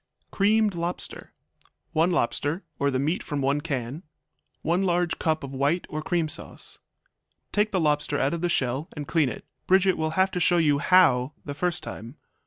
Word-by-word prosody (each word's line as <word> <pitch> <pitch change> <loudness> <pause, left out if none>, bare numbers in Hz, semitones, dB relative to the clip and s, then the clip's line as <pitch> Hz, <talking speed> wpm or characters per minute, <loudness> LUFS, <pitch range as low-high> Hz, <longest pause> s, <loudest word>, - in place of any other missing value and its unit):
Creamed 210 +1 +3
Lobster 170 +1 -4 0.6
1 165 +3 +3
lobster, 155 +2 0 0.2
or 140 - +2
the 130 - 0
meat 150 +7 0
from 145 - -4
1 140 +2 +1
can. 135 -1 -4 0.6
1 175 +3 +1
large 175 -2 0
cup 155 -1 0
of 140 0 -6
white 145 +6 0
or 155 - -3
cream 170 0 0
sauce. - - -4 0.7
Take 210 +1 +1
the 190 - +1
lobster 150 -2 +1
out 140 +3 +1
of 170 - -3
the 175 - +1
shell 135 +2 -1
and 145 -2 -6
clean 155 -6 +2
it; - - -8 0.2
Bridget 190 0 +4
will 160 0 0
have 190 +1 +3
to 180 - -2
show 175 0 +3
you 150 -4 +3
how 145 -7 +4
the 145 - -4
first 175 +4 -1
time. 115 +5 -8
160 Hz, 185 wpm, -26 LUFS, 140-180 Hz, 0.7 s, Bridget